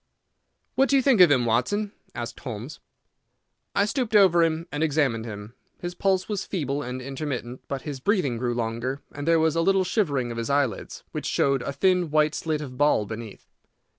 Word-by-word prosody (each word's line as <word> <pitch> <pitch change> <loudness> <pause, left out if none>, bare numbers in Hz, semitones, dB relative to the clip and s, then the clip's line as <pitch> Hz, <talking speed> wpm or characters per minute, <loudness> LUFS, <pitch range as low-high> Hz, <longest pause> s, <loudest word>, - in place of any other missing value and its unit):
"What 270 - +3
do 280 - +4
you 270 - +4
think 250 -8 +5
of 180 - +9
him, 130 -4 +3
Watson?" 125 - 0 0.2
asked - - -5
Holmes. - - -7 1.0
I 200 - +4
stooped 235 -1 -1
over 185 -4 +6
him 165 0 +1
and 145 - -3
examined 140 -7 +1
him. 105 0 -8 0.3
His 175 0 -5
pulse 190 0 +1
was 205 -3 -2
feeble 145 -6 -2
and 125 -1 -5
intermittent, 135 -3 -5
but 135 -1 -4
his 145 -3 -5
breathing 145 - +1
grew 120 -1 -1
longer, 120 +4 -3
and 145 +2 -6
there 165 -1 +5
was 160 0 +2
a 165 - +2
little 195 +2 +3
shivering 145 - 0
of 115 - -4
his 115 - -3
eyelids, 140 -7 -1
which - - -4
showed 135 -2 +2
a 130 - -3
thin 180 +4 +2
white 155 0 +3
slit 155 -2 -2
of 130 -3 -8
ball 145 -7 +3
beneath. 110 0 -8
145 Hz, 195 wpm, -25 LUFS, 125-180 Hz, 1.0 s, of